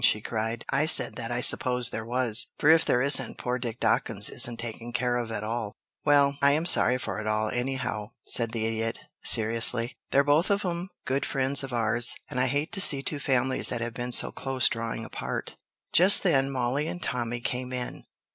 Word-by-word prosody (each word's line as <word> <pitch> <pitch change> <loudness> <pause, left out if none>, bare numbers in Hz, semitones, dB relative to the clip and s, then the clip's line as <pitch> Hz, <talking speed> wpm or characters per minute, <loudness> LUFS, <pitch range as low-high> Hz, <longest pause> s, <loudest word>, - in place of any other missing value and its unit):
she 105 - +4
cried. 115 +1 -4
"I 140 +3 +1
said 160 - +5
that 115 -2 -4
I 120 0 -2
supposed 125 0 +4
there 115 - -5
was, 120 -1 +4
for 150 - +4
if 160 0 +4
there 125 - +1
isn't, 135 -3 +3
poor 125 0 -3
Dick 120 -1 -6
Dawkins - - +2
isn't 120 -1 +3
taken 115 0 -6
care 120 0 -1
of 120 -2 -3
at 105 - -4
all." 110 -1 -4 0.3
"Well, 140 -1 +3
I'm 145 +4 +3
sorry 125 -7 +2
for 125 - -5
it 110 - -6
all, 110 0 -1
anyhow," 120 -4 -3 0.2
said 115 -2 -2
the 115 -1 -3
Idiot, 115 0 -3 0.2
seriously. 115 +1 +1
"They're 140 - +3
both 145 +5 +2
of 200 0 0
'em 175 +1 -3 0.2
good 135 +2 -1
friends 135 +1 +1
of 135 - -6
ours, 120 0 0 0.2
and 125 - -3
I 130 - +2
hate 145 +4 -1
to 200 -3 0
see 140 -7 +2
two 150 - -3
families 130 -1 +1
that 120 - -4
have 120 0 -4
been 120 +1 -5
so - - +3
close 130 -2 +2
drawing 115 -1 -5
apart." - - -6 0.4
Just 190 +4 +5
then 135 -7 +2
Mollie 135 +3 -2
and 175 - -6
Tommy 120 -1 -3
came 125 +2 -4
in. 125 -1 -5
125 Hz, 205 wpm, -26 LUFS, 115-140 Hz, 0.4 s, said